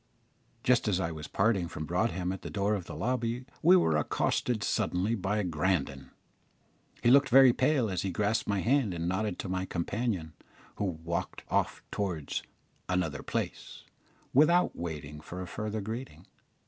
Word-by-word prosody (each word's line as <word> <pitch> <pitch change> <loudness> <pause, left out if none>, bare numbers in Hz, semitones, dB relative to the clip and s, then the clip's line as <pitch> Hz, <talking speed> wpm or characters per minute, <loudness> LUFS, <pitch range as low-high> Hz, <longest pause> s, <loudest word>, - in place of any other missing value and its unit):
Just 125 -2 +3
as 95 -3 +2
I 85 -3 -1
was 75 -1 -7
parting 100 -4 +1
from 80 -2 -6
Broadhem 90 +1 0
at 95 - -5
the - - -6
door 100 +1 0
of 95 -5 -2
the - - -8
lobby 120 0 -1 0.2
we 175 +4 +7
were 80 - +3
accosted 110 +8 0
suddenly 95 +5 0
by 105 0 0
Grandon. 75 -6 -1 0.9
He 120 - +5
looked 140 0 +6
very 130 0 +8
pale 130 -2 +2
as 95 -4 -2
he 95 - -2
grasped 105 +5 0
my 100 -2 +1
hand 120 -7 +2
and 85 0 -2
nodded 95 +1 -1
to - - -5
my 95 0 -1
companion, 90 -2 -2 0.4
who 105 - -1
walked 85 -1 -3
off - - 0
towards 90 -8 -2 0.5
"another 80 -7 0
place" - - -4 0.5
without 170 +6 +4
waiting 75 -3 -6
for 90 +4 -8
a 95 - -4
further 105 +3 -4
greeting. 110 - -6
95 Hz, 160 wpm, -30 LUFS, 85-115 Hz, 0.9 s, very